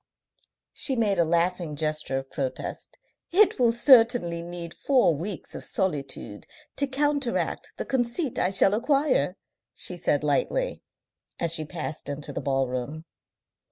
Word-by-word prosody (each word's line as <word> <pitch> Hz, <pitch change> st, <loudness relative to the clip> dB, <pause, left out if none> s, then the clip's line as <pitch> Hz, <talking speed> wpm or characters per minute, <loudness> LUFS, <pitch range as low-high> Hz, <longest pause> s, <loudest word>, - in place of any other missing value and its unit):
She 270 Hz, -, +3 dB
made 210 Hz, -5 st, +1 dB
a -, -, +6 dB
laughing 170 Hz, -1 st, 0 dB
gesture 155 Hz, -3 st, -2 dB
of 135 Hz, 0 st, -6 dB
protest. 135 Hz, -2 st, -5 dB, 0.3 s
"It 395 Hz, -2 st, +4 dB
will 240 Hz, -2 st, +4 dB
certainly 230 Hz, -, +4 dB
need 170 Hz, -1 st, -7 dB
four 255 Hz, -11 st, +3 dB
weeks 180 Hz, +5 st, -5 dB
of -, -, -6 dB
solitude 140 Hz, -, -3 dB, 0.3 s
to 280 Hz, -, +2 dB
counteract 280 Hz, -2 st, -1 dB
the -, -, -4 dB
conceit 250 Hz, +2 st, -1 dB
I 180 Hz, -, +2 dB
shall 195 Hz, +1 st, +5 dB
acquire," 255 Hz, -, +1 dB, 0.4 s
she -, -, -1 dB
said -, -, 0 dB
lightly, -, -, 0 dB, 0.6 s
as 170 Hz, -1 st, +3 dB
she 155 Hz, -2 st, +3 dB
passed 150 Hz, -3 st, -6 dB
into 145 Hz, +1 st, -5 dB
the -, -, -4 dB
ballroom. 135 Hz, +3 st, -2 dB
175 Hz, 135 wpm, -26 LUFS, 150-245 Hz, 0.6 s, a